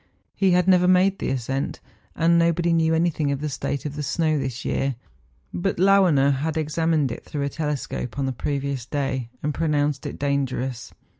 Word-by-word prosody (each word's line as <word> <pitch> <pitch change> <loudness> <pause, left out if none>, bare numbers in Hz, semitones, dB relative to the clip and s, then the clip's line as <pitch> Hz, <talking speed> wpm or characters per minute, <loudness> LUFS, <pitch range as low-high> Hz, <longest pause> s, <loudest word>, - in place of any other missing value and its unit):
He 195 - +2
had 180 0 +3
never 180 -1 +5
made 185 +1 +4
the - - -2
ascent, 135 +1 -2 0.4
and 170 +1 +3
nobody 170 0 +2
knew 160 -1 +3
anything 160 -3 +1
of 140 - -2
the 150 +1 -3
state 140 +1 -3
of 145 -1 -4
the 150 - -3
snow 155 +1 0
this 130 -2 -4
year; 135 -1 0 0.6
but 85 - -1
Lauener 180 -7 +4
had 160 +3 -2
examined 155 -2 +1
it - - -7
through 145 -2 -4
a 140 - -1
telescope 145 -5 -4
on 140 - 0
the 135 - -1
previous 140 0 -3
day, 135 -4 -2
and 150 0 0
pronounced 145 -3 0
it - - -6
dangerous. 135 -3 -2
150 Hz, 180 wpm, -24 LUFS, 135-165 Hz, 0.6 s, never